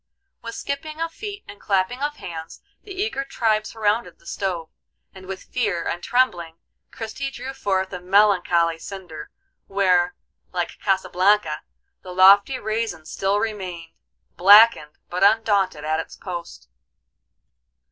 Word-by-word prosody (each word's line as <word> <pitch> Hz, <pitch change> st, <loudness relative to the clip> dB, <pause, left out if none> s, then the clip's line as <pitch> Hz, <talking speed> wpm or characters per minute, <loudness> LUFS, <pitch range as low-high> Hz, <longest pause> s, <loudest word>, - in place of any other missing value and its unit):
With 230 Hz, 0 st, -7 dB
skipping 305 Hz, +3 st, -5 dB
of 330 Hz, 0 st, -2 dB
feet 415 Hz, -1 st, -7 dB
and 205 Hz, -, -12 dB
clapping 195 Hz, +6 st, 0 dB
of 295 Hz, +1 st, -1 dB
hands 165 Hz, -, -8 dB, 0.2 s
the 410 Hz, -, -13 dB
eager 385 Hz, -7 st, -2 dB
tribe 220 Hz, -5 st, 0 dB
surrounded 220 Hz, +1 st, -1 dB
the -, -, -26 dB
stove, 175 Hz, -5 st, -3 dB, 0.4 s
and 185 Hz, -1 st, -13 dB
with 190 Hz, 0 st, -6 dB
fear 205 Hz, -9 st, -1 dB
and 175 Hz, -, -3 dB
trembling 175 Hz, -9 st, 0 dB, 0.3 s
Christie 260 Hz, +5 st, -5 dB
drew 265 Hz, 0 st, -7 dB
forth 190 Hz, -6 st, -1 dB
a 180 Hz, -, -4 dB
melancholy 180 Hz, -4 st, +3 dB
cinder, 175 Hz, -5 st, -9 dB, 0.4 s
where, 180 Hz, -3 st, +2 dB, 0.4 s
like 175 Hz, -2 st, -3 dB
Casablanca, 190 Hz, -3 st, +1 dB, 0.4 s
the 180 Hz, -1 st, -9 dB
lofty 200 Hz, +7 st, +6 dB
raisin 215 Hz, -8 st, -3 dB
still 195 Hz, +5 st, 0 dB
remained, 185 Hz, -6 st, -4 dB, 0.5 s
blackened, 200 Hz, -5 st, +6 dB
but 180 Hz, +2 st, -2 dB
undaunted, 200 Hz, -7 st, +2 dB
at 155 Hz, +1 st, 0 dB
its -, -, -7 dB
post. 170 Hz, -, -8 dB
195 Hz, 130 wpm, -23 LUFS, 175-230 Hz, 0.5 s, lofty